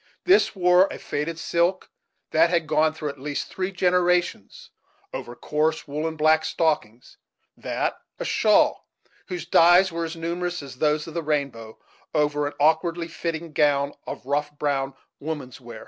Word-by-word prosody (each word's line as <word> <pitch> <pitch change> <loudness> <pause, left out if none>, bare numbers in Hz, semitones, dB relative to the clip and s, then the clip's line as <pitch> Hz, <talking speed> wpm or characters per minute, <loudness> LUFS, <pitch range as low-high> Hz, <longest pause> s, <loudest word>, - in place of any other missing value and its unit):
This 370 - +4
wore 180 0 +5
a - - -6
faded 160 +3 -4
silk, 170 +3 0 0.4
that 165 +2 +4
had 170 -2 +1
gone 155 0 +2
through 155 -1 -5
at 140 - -9
least 145 +1 -4
three 185 0 -3
generations, 180 - 0 0.4
over 120 - -6
coarse, 155 +4 -1
woollen 155 +3 -3
black 155 0 +3
stockings; 135 -8 -2 0.4
that, - - -3 0.2
a - - -5
shawl, - - +2 0.4
whose 175 -2 -5
dyes 175 +2 +5
were 165 0 -3
as 165 +1 -6
numerous 175 0 -3
as 135 -2 -10
those 150 +2 +1
of 165 - -9
the 170 - -2
rainbow, 140 -8 -3 0.4
over 150 -1 +1
an 145 - -6
awkwardly 165 +3 +2
fitting 165 -1 -5
gown 145 -1 +2
of - - -7
rough 145 +2 -1
brown 135 -2 -1 0.2
"woman's 140 -5 -6
wear." 120 -2 -10
155 Hz, 155 wpm, -24 LUFS, 145-170 Hz, 0.4 s, wore